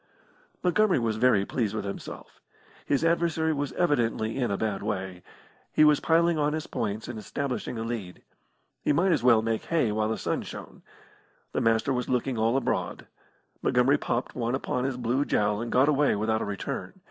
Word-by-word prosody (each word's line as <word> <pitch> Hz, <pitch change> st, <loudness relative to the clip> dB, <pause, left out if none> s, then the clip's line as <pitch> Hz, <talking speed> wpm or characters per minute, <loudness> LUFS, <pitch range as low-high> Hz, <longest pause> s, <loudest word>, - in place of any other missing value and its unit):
Montgomery 200 Hz, +2 st, +3 dB
was 115 Hz, -3 st, 0 dB
very 110 Hz, -5 st, +3 dB
pleased 110 Hz, -2 st, -2 dB
with 105 Hz, -2 st, -3 dB
himself. 100 Hz, -, -8 dB, 0.5 s
His 145 Hz, +3 st, +1 dB
adversary 165 Hz, -1 st, +1 dB
was 145 Hz, -1 st, -2 dB
evidently 120 Hz, -9 st, +1 dB
in 125 Hz, -3 st, 0 dB
a 100 Hz, -, -1 dB
bad 105 Hz, -2 st, -2 dB
way. 95 Hz, -3 st, -4 dB, 0.5 s
He -, -, +4 dB
was 150 Hz, -1 st, +5 dB
piling 165 Hz, 0 st, +3 dB
on 150 Hz, 0 st, +1 dB
his 155 Hz, 0 st, -3 dB
points 110 Hz, 0 st, -3 dB
and 120 Hz, -2 st, -6 dB
establishing 125 Hz, +2 st, -4 dB
a 115 Hz, -, -3 dB
lead. 115 Hz, -6 st, -5 dB, 0.6 s
He -, -, +2 dB
might 185 Hz, +5 st, +3 dB
as 150 Hz, -7 st, +2 dB
well 115 Hz, -3 st, +5 dB
make 115 Hz, -1 st, -1 dB
hay 160 Hz, -10 st, +1 dB
while 110 Hz, 0 st, 0 dB
the 110 Hz, -, -1 dB
sun -, -, -2 dB
shone. -, -, -9 dB, 0.7 s
The -, -, -1 dB
Master 115 Hz, +4 st, +2 dB
was 125 Hz, -1 st, -2 dB
looking 125 Hz, +1 st, 0 dB
all 115 Hz, +3 st, +2 dB
abroad. 135 Hz, -, -2 dB, 0.6 s
Montgomery 125 Hz, +3 st, +3 dB
popped 120 Hz, +2 st, -2 dB
one 120 Hz, 0 st, -1 dB
upon 125 Hz, -1 st, -2 dB
his 135 Hz, -2 st, -2 dB
blue 125 Hz, +3 st, 0 dB
jowl 105 Hz, -5 st, +1 dB
and 115 Hz, -, -4 dB
got 130 Hz, +3 st, +4 dB
away 145 Hz, -3 st, +3 dB
without 110 Hz, +1 st, 0 dB
a -, -, -1 dB
return. 100 Hz, -1 st, -4 dB
120 Hz, 185 wpm, -27 LUFS, 110-145 Hz, 0.7 s, was